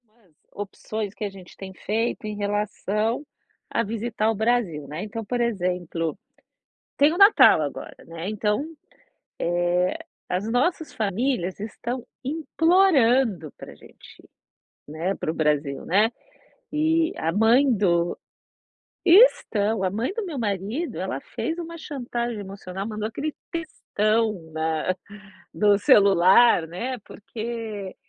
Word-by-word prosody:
Nas 215 -5 -31 0.2
opções 205 0 -5
que 220 - -7
a 205 - -1
gente 190 -3 -14
tem 190 -1 -9
feito 220 +4 -2
em 210 0 -4
relação 210 +4 -1 0.4
a - - 0
visitar 220 0 -1
o - - -3
Brasil, 215 -10 0
né, 150 +4 -5
então 220 +2 -5
por 245 +4 -3
exemplo, 180 -7 -1 0.8
tem 290 +3 +5
o - - -3
natal 400 - +7
agora, 145 -2 -5
né, 165 +3 -6
então, 210 +3 0 0.8
eh, 175 - +1 0.3
as 190 +5 -2
nossas 305 +6 0
famílias 210 -2 -1
estão 235 +3 -5 0.2
implorando 270 - +2
pra - - -10
gente - - -17
ir, - - -22 0.6
né, 170 +5 -2
pro 160 - -3
Brasil, 150 -3 0
né. 210 +6 +3 0.6
E 320 +2 +2
a 165 - -1
mãe 230 +8 +4
do 175 -6 +1 0.9
estão, 225 - +4
a 185 - +1
mãe 225 - -2
do 450 - -3
meu 325 -7 -5
marido 210 - -2
ela - - -3
fez 325 +1 -4
uma 335 -1 -6
chantagem 240 -6 -4
emocional, 195 -1 -7
mandou 215 -1 -3
aquele 290 +7 -4 0.2
textão 225 -9 0 0.2
na 160 +3 -1 0.6
no 205 -1 +4
celular, 195 -1 +5
né, 240 +10 -4
porque, 215 -2 -6
215 Hz, 125 wpm, -24 LUFS, 185-245 Hz, 0.9 s, natal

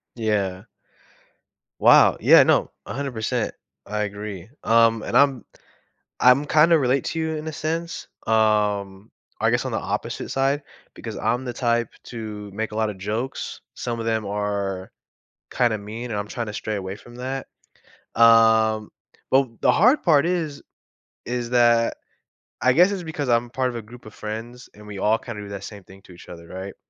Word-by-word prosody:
Yeah. 105 -3 -1 1.2
Wow, - - +6
yeah, - - +7
no, - - +2
100%, 125 -3 -3 0.3
I 105 0 -2
agree, 100 -2 -6
um, 115 -1 +4
and 120 - +1
I'm 135 -4 +3 0.8
I'm 125 +4 +5
kinda 160 +3 +5
relate 130 +1 +1
to 165 - -3
you 160 0 -1
in 155 +1 -6
a 155 - -4
sense, 165 +1 -4 0.2
um, 105 -2 +1 0.3
I - - +2
guess, - - 0
on - - -3
the - - -1
opposite - - -4
side, 135 +2 +1 0.3
because - - -7
I'm 125 +2 -1
the 120 - -4
type 120 -1 0 0.2
to 105 -3 -7
make 110 +2 -4
a - - -7
lotta 110 -1 0
jokes, 110 +7 -4
some 120 -1 -4
of 115 - -4
them 110 -2 0
are 100 -2 -3 0.6
kinda 120 -3 +1
mean, 110 +4 -7
and 105 - -2
I'm 105 - -4
trying 115 0 -4
to 105 - -5
stray 110 0 -3
away 95 0 -5
from 120 +3 -15
that. 130 +2 -5 0.7
Um, 110 -2 +5 0.4
but 130 - +6
w 115 -3 -16
the - - +5
hard 250 +9 +4
part 155 -3 +4
is 165 -5 -2 0.6
is 120 -1 -3
that 120 -1 +3 0.6
I 130 - +4
guess 180 +6 +5
it's 190 -3 -4
because 150 -4 -4
I'm 120 0 +2
part 130 +1 -1
of 120 - -7
a 115 - -4
group 120 +3 -15
of 110 - -11
friends, 115 +3 -7
and 105 0 -14
we 100 -1 -7
all 110 +3 +3
kinda 110 -3 -7
do 100 - -9
that 100 0 -7
same 100 -3 -10
thing 95 +1 -16
to 90 - -15
each 85 - -15
other, 85 -1 -11
right? 95 +2 -7
115 Hz, 180 wpm, -23 LUFS, 105-130 Hz, 1.2 s, yeah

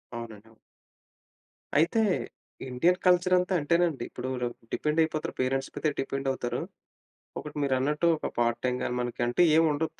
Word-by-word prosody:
అవునండి. 115 -2 -8
అవును. 110 - -24 1.2
అయితే 170 +9 +3 0.7
ఇండియన్ 170 +9 +2
కల్చర్ 180 0 +4
అంతా 180 +1 0
అంతేనండి. 170 0 +1
ఇప్పుడు 130 +1 -5 0.4
డిపెండ్ 150 +2 0
అయిపోతారు. 155 -1 -3
పేరెంట్స్ 135 +1 -1
మీదే 155 - 0
డిపెండ్ 135 0 -2
అవుతారు. 120 -2 -3 0.8
ఒకటి 150 - -9
మీరన్నట్టు 140 +4 +1
ఒక - - -4
పార్ట్ 120 0 +1
టైమ్ 125 0 0
గాని 125 - -2
మనకి 120 0 -4
అంటే 120 +9 +3
ఏమి 165 0 +5
ఉండదు. 155 +2 -1
145 Hz, 145 wpm, -28 LUFS, 125-165 Hz, 1.2 s, ఏమి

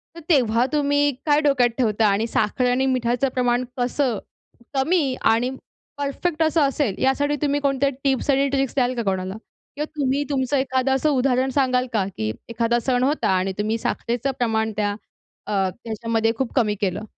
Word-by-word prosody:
तर - - -8
तेव्हा 245 -6 +3
तुम्ही 285 0 +2
काय 295 -1 +4
डोक्यात 275 -5 +3
ठेवता 220 -3 +2
आणि 205 +3 +1
साखर 235 +3 0
आणि 265 +2 +1
मिठाचं 255 +1 +1
प्रमाण 245 -1 +1
कसं 245 -1 0 0.6
कमी 275 0 +1 0.2
आणि 240 +3 0 0.5
परफेक्ट 300 +4 -2
असं 315 0 +2
असेल 275 -6 +1
यासाठी 285 +2 +2
तुम्ही 290 -1 +1
कोणत्या 275 0 +1
टिप्स 270 0 0
आणि 275 0 +3
ट्रिक्स 270 -2 -1
द्याल 255 -2 +2
का 235 - -2
कोणाला? 190 -1 -2 0.4
किंवा 300 +1 -2
तुम्ही 280 +1 +1
तुमचं 275 0 0
एखादं 260 0 0
असं 300 +3 +1
उदाहरण 260 -1 +2
सांगाल 255 -2 +2
का, 205 -4 +1
की 110 0 -1 0.2
एखादा 230 +1 +1
सण 250 +1 0
होता 270 -5 +1
आणि 190 +1 -1
तुम्ही 215 +2 0
साखरेचं 240 +3 -2
प्रमाण 220 -2 0
त्या 205 -1 +1 0.6
अ, - - -2 0.3
त्याच्यामध्ये 225 0 0
खूप 265 -3 -2
कमी 215 -5 +2
केलं? 195 +1 -1
255 Hz, 170 wpm, -22 LUFS, 230-280 Hz, 0.6 s, काय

